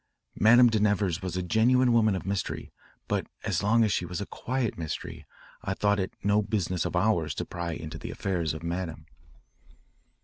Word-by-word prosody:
Madame 120 +3 +7
de 110 -2 +2
Nevers 100 -3 +1
was 90 -1 -3
a 90 - -1
genuine 120 +6 +3
woman 110 -3 +4
of 95 - -5
mystery, 100 -1 -3 0.4
but - - -1 0.2
as - - 0
long 115 +3 +4
as 105 - +2
she - - 0
was 85 0 -4
a 100 - -3
quiet 125 0 -2
mystery, 80 -3 -6 0.3
I 100 0 -3
thought 100 0 +2
it 95 - -2
no 105 +1 +3
business 95 -5 -1
of - - -2
ours 90 -4 +1
to - - -3
pry 85 -1 -4
into 80 0 -7
the - - -7
affairs 85 -6 -2
of 80 - -8
Madame." 85 -2 -4
100 Hz, 190 wpm, -28 LUFS, 85-110 Hz, 0.4 s, Madame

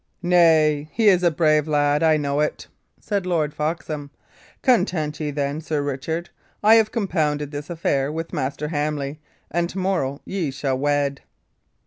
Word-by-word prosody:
"Nay, 160 -4 +4
he 220 -2 +4
is 180 -2 +4
a 175 - +4
brave 155 -2 +2
lad 145 0 +2
I 160 -1 +4
know 145 -1 -1
it," 150 - -1 0.3
said 200 -3 -2
Lord 155 -4 0
Foxham. 150 -2 -3 0.5
"Content 170 - +1
ye, 150 -2 -2
then, 145 +1 -2
Sir 155 -2 -2
Richard. 160 +5 -3 0.3
I 215 +2 +7
have 225 -1 +4
compounded 150 - -1
this 145 0 -6
affair 145 -5 0
with 165 +3 -5
Master 145 0 -2
Hamley, 150 -1 -2 0.3
and 170 +1 0
to 190 - -8
morrow 180 -8 -1
ye 185 -6 -2
shall 135 -1 -2
wed." 145 -1 0
155 Hz, 155 wpm, -22 LUFS, 145-170 Hz, 0.5 s, I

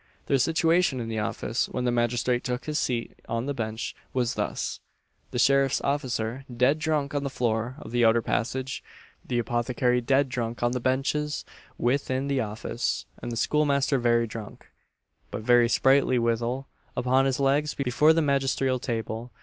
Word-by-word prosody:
Their 135 - +2
situation 165 -1 +2
in 115 -1 -4
the 110 -1 -2
office, 115 +2 -1
when 125 - -3
the 125 - +2
magistrate 120 +1 +1
took 125 0 -3
his 150 -1 -1
seat 120 -2 -2
on 115 +1 -1
the 145 - -2
bench, 110 -2 -4 0.2
was 125 -2 0
thus: - - -3 0.5
The - - -4
sheriff's 135 +2 +3
officer 130 -3 -2
dead 135 +5 +3
drunk 155 -3 0
on 145 -1 -1
the 140 - -2
floor 120 -1 -1
of 110 - -10
the 120 0 +2
outer 115 0 +4
passage; 130 +2 -2 0.4
the 120 - -2
apothecary 120 +1 +1
dead 135 +3 +2
drunk 120 -3 -3
on 120 - +2
the 125 - -1
benches 135 +4 -1 0.3
within 130 +2 0
the 140 -1 +1
office; 105 -1 -3 0.2
and - - -4
the 115 - -4
schoolmaster 140 0 +2
very 120 -1 +3
drunk, 110 -2 -9 0.6
but - - -5
very 120 0 +5
sprightly 135 0 +4
withal, 120 +3 0 0.3
upon 130 +2 +3
his 135 -1 0
legs 140 +2 +2
before 140 +3 +3
the 165 0 +3
magisterial 135 -2 +1
table. 115 -1 -4
125 Hz, 165 wpm, -26 LUFS, 120-140 Hz, 0.6 s, very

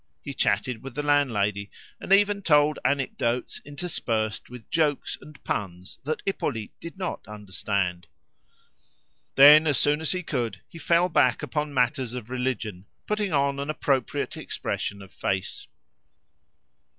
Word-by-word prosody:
He - - -6
chatted 120 -3 0
with 135 - -9
the 145 - -2
landlady; 105 -9 +1 0.3
and - - -7
even 200 +1 +4
told 150 -4 +3
anecdotes 125 -3 -1
interspersed 120 -8 -3
with 125 -3 -11
jokes 150 -4 +1
and 150 -1 -15
puns 90 -2 -4
that 155 +3 -3
Hippolyte 130 - -2
did 170 +3 -9
not 185 -2 -4
understand. 95 -3 -2 1.3
Then, 150 +3 +9
as 145 -4 +3
soon 150 +4 +2
as 160 - +1
he 185 -1 -2
could, 120 - -2
he 165 - -12
fell 170 +3 +3
back 130 -8 +2
upon 150 -1 -2
matters 125 -2 0
of 125 -1 -7
religion, 115 -7 -3 0.2
putting 210 -2 -1
on 140 -1 +1
an 140 +1 -4
appropriate 135 -4 -1
expression 100 -1 -4
of 95 - -16
face. 95 -1 -3
135 Hz, 140 wpm, -26 LUFS, 110-155 Hz, 1.3 s, Then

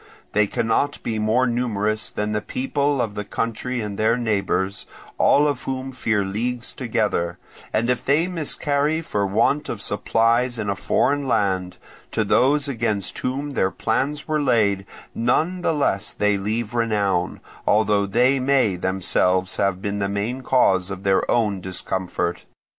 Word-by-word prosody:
They 105 0 +3
cannot 120 +6 0
be 110 -2 -2
more 110 +4 +2
numerous 110 -3 -1
than 105 0 -3
the 105 0 -1
people 140 +3 -1
of 110 -4 -1
the 105 - -4
country 115 +4 -3
and 105 -2 -5
their 110 +2 +3
neighbours, 100 -4 -1 0.3
all 145 +1 +5
of 140 -3 -1
whom 130 0 -3
fear 110 -5 0
leagues 120 +5 -3
together; 105 -8 -1 0.3
and 110 +2 +1
if 125 0 0
they 145 +5 +3
miscarry 155 -2 0
for 105 -10 -1
want 115 +9 +1
of 110 - -4
supplies 115 +4 +1
in 105 -3 -1
a - - -2
foreign 145 +7 +1
land, 95 -6 0 0.4
to - - +1
those 145 +3 +3
against 110 -7 -2
whom 140 +3 -2
their 95 -8 +1
plans 135 +9 -1
were 155 -1 +1
laid 105 -7 +2 0.3
none 160 +10 +1
the 175 - +1
less 140 -10 0
they 105 0 +2
leave 105 +3 -2
renown, 105 -6 0 0.3
although 105 -1 +3
they 125 +6 +3
may 130 -7 +2
themselves 95 0 +1
have 100 -1 0
been 100 0 -2
the 100 -1 0
main 105 +6 -2
cause 95 -8 +2
of 95 0 -6
their 95 -1 +2
own 105 -5 +1
discomfort. 90 -2 -3
110 Hz, 155 wpm, -22 LUFS, 100-130 Hz, 0.4 s, all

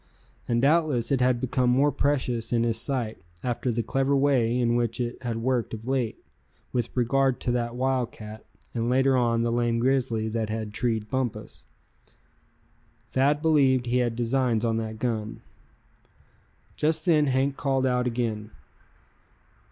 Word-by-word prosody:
And 120 +1 +1
doubtless 150 -5 +2
it 135 -2 +2
had 125 -1 +3
become 125 0 0
more 135 +4 +3
precious 125 -5 -1
in 115 -1 +2
his 115 -1 +1
sight, 120 -6 -2 0.2
after 125 0 -1
the 115 0 -1
clever 135 +3 +1
way 130 -4 +2
in 120 -1 +2
which 120 -1 -1
it 120 0 -3
had 115 -2 -3
worked 125 -3 0
of 110 +2 -11
late, 130 -4 -1 0.6
with 120 -2 0
regard 135 +2 +2
to 125 - -1
that 120 -1 -1
wildcat; 120 -4 -3 0.3
and 115 0 -1
later 130 +1 +3
on 115 -2 +2
the 120 - 0
lame 120 -1 +1
grizzly 120 -3 +1
that 110 -1 -2
had 110 -1 -4
treed 110 0 -1
Bumpus. 125 - -4 1.5
Thad 145 +3 +2
believed 135 -6 +3
he 120 +1 +1
had 120 -2 0
designs 120 -1 +1
on 115 -1 +1
that 110 -1 -4
gun. 110 -2 -3 1.3
Just 155 +4 0
then 155 -4 +4
Hank 135 +1 +1
called 135 -2 0
out 125 -1 +1
again. 115 -3 -2
125 Hz, 150 wpm, -26 LUFS, 115-130 Hz, 1.5 s, then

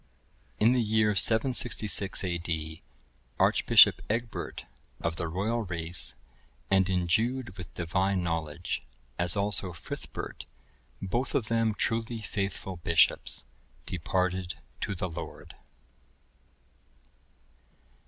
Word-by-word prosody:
(1081) 105 - +4
In 120 - +5
the 125 -2 +2
year 105 -1 +3
766 110 -3 +3
A.D., 85 -3 -3 0.6
Archbishop - - +6
Egbert, 115 +1 -3 0.3
of 85 - -2
the 85 - -3
royal 105 +8 -1
race, 85 -1 -2 0.6
and 95 -1 +4
endued 100 +6 0
with 90 -3 -8
divine 95 +2 0
knowledge, 85 0 -3 0.4
as 90 +3 +2
also 100 -2 0
Frithbert, 80 - -6 0.6
both 120 +8 -1
of 110 - 0
them 115 -2 +1
truly 115 +1 0
faithful 100 -3 -4
bishops, 85 -1 +3 0.4
departed 90 +1 -1 0.2
to 100 - -3
the 95 - -2
Lord. 80 - -8
95 Hz, 100 wpm, -29 LUFS, 85-110 Hz, 0.6 s, Archbishop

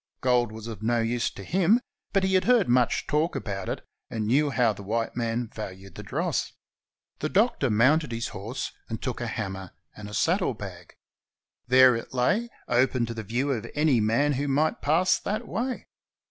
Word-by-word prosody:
Gold 125 -3 +2
was 110 0 -9
of 110 -4 -7
no 120 +2 +1
use 115 +1 0
to 100 - -10
him, 190 - +3 0.3
but 195 -1 +2
he 190 0 +1
had 185 - +3
heard 240 -6 +4
much 125 0 +2
talk 155 +3 0
about 95 -3 -4
it, - - -4 0.2
and 110 -2 -3
knew 140 +7 +3
how 125 -5 +2
the 100 - -10
white 115 +3 -2
men 115 0 -1
valued 95 -2 -8
the - - -8
dross. - - -2 0.7
The 155 - -2
Doctor 200 - +2
mounted 130 +7 +3
his 115 0 -3
horse 110 +7 -5 0.2
and 115 -1 -4
took 125 -2 -4
a 120 - -2
hammer 95 -5 -5 0.2
and 105 -1 -8
a 105 - -6
saddlebag. 105 - -1 0.7
There 130 0 +7
it 115 +3 -6
lay, 205 - +1 0.2
open 125 0 +2
to 115 - -5
the 115 - -5
view 120 +7 -1
of 115 -6 -2
any 150 -5 +3
man 115 +8 +2
who 140 +2 -1
might 150 +3 +1
pass 170 +5 +3
that 215 +3 -3
way. 245 +5 -3
125 Hz, 190 wpm, -26 LUFS, 110-150 Hz, 0.7 s, There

